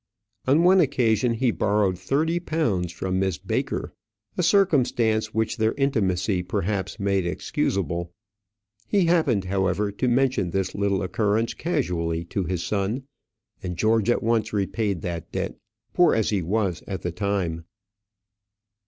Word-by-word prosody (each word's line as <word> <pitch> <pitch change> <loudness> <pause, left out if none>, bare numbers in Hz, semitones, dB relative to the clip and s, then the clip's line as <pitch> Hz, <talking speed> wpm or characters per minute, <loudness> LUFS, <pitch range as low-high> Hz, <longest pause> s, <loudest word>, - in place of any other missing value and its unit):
On 145 +6 +4
one 185 +2 +6
occasion 125 - +2
he 125 +1 +2
borrowed 100 -3 +1
thirty 145 - 0
pounds 115 - -1
from 95 +2 -2
Miss 95 -3 0
Baker; - - -3 0.4
a - - 0
circumstance 125 - +2
which 110 +2 -1
their 110 0 +2
intimacy, 100 -9 +1
perhaps, 95 +1 -2
made 100 -2 +1
excusable. 85 -1 -2 0.8
He 195 -3 +2
happened, 155 - +2
however, 95 +2 0
to 115 +6 -1
mention 125 -6 +2
this 95 +1 -1
little 100 -1 0
occurrence 105 +5 0
casually 85 - -1
to 100 -3 0
his 90 -2 -2
son, 105 +6 -1 0.6
and 90 -2 -5
George 110 +2 +2
at 120 - +2
once 115 -1 +1
repaid 100 -2 -1
that 85 -1 -5
debt, 95 0 -3 0.4
poor 175 -1 +4
as 110 -1 +1
he 100 -3 +1
was 95 0 -1
at 95 - -5
the 90 - -2
time. 90 -3 -2
100 Hz, 140 wpm, -24 LUFS, 95-120 Hz, 0.8 s, one